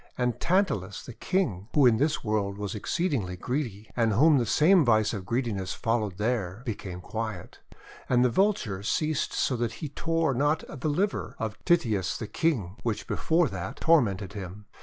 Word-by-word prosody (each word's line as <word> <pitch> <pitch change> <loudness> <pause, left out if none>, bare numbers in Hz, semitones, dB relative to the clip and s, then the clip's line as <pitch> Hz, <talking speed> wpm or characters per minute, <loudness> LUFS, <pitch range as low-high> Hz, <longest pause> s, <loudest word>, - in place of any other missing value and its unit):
And 125 -1 0
Tantalus 170 - 0
the 125 - -8
King, 120 - -1
who 145 -3 +6
in 115 -3 +5
this 150 +4 0
world 105 -3 -1
was 100 -1 -4
exceeding 130 - -1
greedy, 120 -5 -3
and 115 -3 +2
whom 145 +6 +5
the 120 - -1
same 170 - +5
vice 110 -4 +3
of 95 -4 -5
greediness 110 -6 -1
followed 110 -5 -1
there, 105 -2 -2
became 95 -6 -5
quiet. 110 -3 -5 0.5
And 125 0 +4
the 125 - +2
Vulture 155 - +1
ceased 155 +8 0
so 130 - 0
that 120 -1 -1
he 155 - -6
tore 165 0 0
not 145 +5 +1
the 150 +1 -3
liver 195 +8 -1
of 110 -3 -5
Tityus 110 - +2
the - - -5
King, 110 - -1
which 110 -3 -2
before 165 0 +1
that 95 -2 -5
tormented 100 - +2
him. 100 0 -8
115 Hz, 170 wpm, -27 LUFS, 100-150 Hz, 0.5 s, who